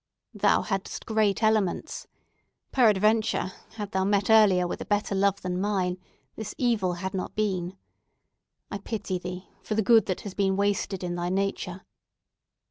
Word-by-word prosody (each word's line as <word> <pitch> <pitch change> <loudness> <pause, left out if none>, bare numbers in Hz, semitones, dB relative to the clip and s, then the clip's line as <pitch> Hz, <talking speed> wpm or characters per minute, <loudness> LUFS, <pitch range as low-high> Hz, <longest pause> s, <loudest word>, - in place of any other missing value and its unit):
"Thou - - +3
hadst 195 -3 -4
great 220 -1 +1
elements. 215 -4 0 0.6
Peradventure, 215 -4 +3 0.2
hadst 205 -2 -5
thou 190 0 +1
met 200 +2 +2
earlier 200 -5 +6
with 175 - -4
a - - -4
better 205 0 0
love 195 0 +2
than 180 0 -2
mine, 185 -3 0 0.4
this 220 -1 -6
evil 220 -8 +1
had 185 +2 -4
not 190 - -4
been. 190 -3 -1 0.9
I 200 - -3
pity 200 -3 -3
thee, 180 +1 -7
for 215 - -3
the 220 - +2
good 225 0 +5
that 185 - -2
has 205 - -7
been 195 -1 +1
wasted 200 -1 0
in 175 -1 -2
thy 175 0 -2
nature." 190 -1 -2
195 Hz, 155 wpm, -27 LUFS, 185-215 Hz, 0.9 s, earlier